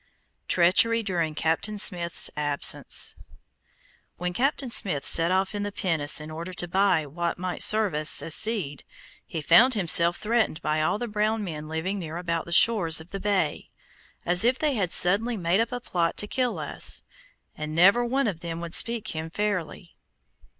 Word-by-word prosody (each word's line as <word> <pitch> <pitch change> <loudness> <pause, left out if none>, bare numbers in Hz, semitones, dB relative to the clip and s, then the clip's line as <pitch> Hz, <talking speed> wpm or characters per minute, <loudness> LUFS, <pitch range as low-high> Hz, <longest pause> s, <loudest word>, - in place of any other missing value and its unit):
TREACHERY 225 +6 +3
DURING 170 -6 -2
CAPTAIN 165 +7 -1
SMITH'S 175 -4 +2
ABSENCE 145 -1 0 1.0
When 180 0 -4
Captain 265 +3 -1
Smith 150 -11 +1
set 165 0 +4
off 190 +1 0
in 205 - -4
the 205 0 -4
pinnace 160 -7 +1
in 155 +1 -9
order 170 +4 -7
to 175 -1 -2
buy 185 -3 +1
what 170 +4 -4
might 180 0 -5
serve 215 -4 +3
us 150 +1 +3
as 165 - -2
seed, 195 -11 -1 0.4
he 160 - -5
found 245 - +5
himself 170 -3 +3
threatened 220 -6 -1
by 155 0 -1
all 155 - 0
the 240 - -5
brown 215 0 -1
men 155 -5 -7
living 165 +6 -4
near 165 -2 -7
about 170 -2 -3
the 170 - -11
shores 170 -5 +3
of 160 +3 -14
the 195 - -5
bay, 195 -6 -2 0.6
as 180 +3 +2
if 250 +2 +2
they 300 -1 0
had 190 -7 -2
suddenly 215 +6 +3
made 175 +1 0
up 230 +1 -1
a 245 - -4
plot 170 -7 -2
to - - 0
kill 250 +2 -2
us, - - -1 0.5
and 155 0 -6
never 195 +8 +4
one 265 +3 -1
of 190 -7 -3
them 165 -1 -6
would 170 -1 -7
speak 230 -1 +2
him 160 0 -5
fairly. 180 -3 -4
180 Hz, 180 wpm, -25 LUFS, 165-215 Hz, 1.0 s, found